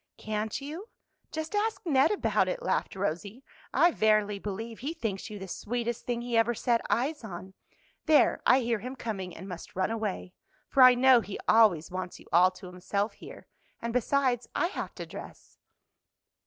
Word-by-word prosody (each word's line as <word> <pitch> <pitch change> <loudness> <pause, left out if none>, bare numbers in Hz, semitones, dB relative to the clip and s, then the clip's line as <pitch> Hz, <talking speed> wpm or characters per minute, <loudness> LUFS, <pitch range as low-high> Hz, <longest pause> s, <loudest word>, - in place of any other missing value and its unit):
"Can't 215 0 -3
you? 325 - -7 0.4
just 315 +2 -5
ask 430 +2 0
Ned 275 -5 +4
about 420 - +1
it," - - -3
laughed - - -1
Rosie. 200 - -3 0.3
"I 340 +6 +4
verily 215 -5 +2
believe 220 +3 -6
he 295 +7 -4
thinks 220 - -4
you 210 - -7
the 190 -1 -7
sweetest 235 +4 -4
thing 240 -1 -2
he 240 -1 -2
ever 230 +1 +3
set 235 +1 +1
eyes 275 +4 0
on. 190 -2 -8 0.5
There, 310 -2 +4
I 255 +2 +5
hear 230 -2 0
him 250 +5 -6
coming, 195 -8 -5
and 190 - -9
must 180 -3 -9
run 190 +3 0
away, 210 -5 -3 0.3
for 270 - +2
I 255 -1 +9
know 255 -1 +6
he 195 -1 -6
always 200 -9 +4
wants 185 0 -5
you - - -16
all 180 +2 +6
to 185 0 -13
himself 185 +4 -2
here; - - -12 0.3
and 235 0 -4
besides, 250 0 +1
I 350 - +1
have - - -6
to - - -6
dress." - - -11
230 Hz, 180 wpm, -29 LUFS, 195-260 Hz, 0.5 s, I